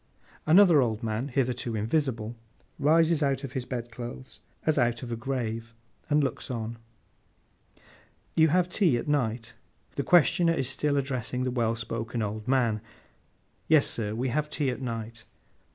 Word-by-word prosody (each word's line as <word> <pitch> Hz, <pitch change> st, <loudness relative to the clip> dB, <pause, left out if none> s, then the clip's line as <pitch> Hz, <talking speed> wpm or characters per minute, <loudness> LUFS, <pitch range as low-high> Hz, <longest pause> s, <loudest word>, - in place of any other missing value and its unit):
Another 170 Hz, -2 st, +7 dB
old 115 Hz, -2 st, -1 dB
man, 110 Hz, +4 st, -2 dB
hitherto 125 Hz, -3 st, -1 dB
invisible, 115 Hz, 0 st, -1 dB, 0.4 s
rises 160 Hz, +2 st, +4 dB
out 140 Hz, -1 st, +1 dB
of 135 Hz, -, -5 dB
his 130 Hz, -2 st, -3 dB
bed 120 Hz, -2 st, -5 dB
clothes, 120 Hz, +2 st, -8 dB, 0.3 s
as 155 Hz, -2 st, +2 dB
out 120 Hz, 0 st, +1 dB
of 120 Hz, -, -6 dB
a -, -, -1 dB
grave, 115 Hz, -2 st, -4 dB, 0.3 s
and 150 Hz, 0 st, +3 dB
looks 135 Hz, -, -3 dB
on. 115 Hz, -1 st, -4 dB, 1.5 s
'You 160 Hz, 0 st, +5 dB
have 175 Hz, +3 st, +2 dB
tea 175 Hz, -, +2 dB
at 120 Hz, -, -5 dB
night?' 115 Hz, -5 st, -1 dB, 0.4 s
The 140 Hz, -, 0 dB
questioner 175 Hz, +1 st, +4 dB
is 135 Hz, -, -1 dB
still 140 Hz, +2 st, 0 dB
addressing 130 Hz, -2 st, -2 dB
the 130 Hz, -, -1 dB
well 115 Hz, -2 st, 0 dB
spoken 115 Hz, 0 st, -3 dB
old 105 Hz, +1 st, -4 dB
man. 120 Hz, -5 st, +2 dB, 0.9 s
'Yes, 155 Hz, -3 st, +5 dB
sir, 110 Hz, -2 st, -3 dB
we 125 Hz, +3 st, -1 dB
have 150 Hz, +4 st, -1 dB
tea 145 Hz, -3 st, 0 dB
at 125 Hz, -, -6 dB
night. 115 Hz, -2 st, -5 dB
125 Hz, 155 wpm, -28 LUFS, 115-145 Hz, 1.5 s, Another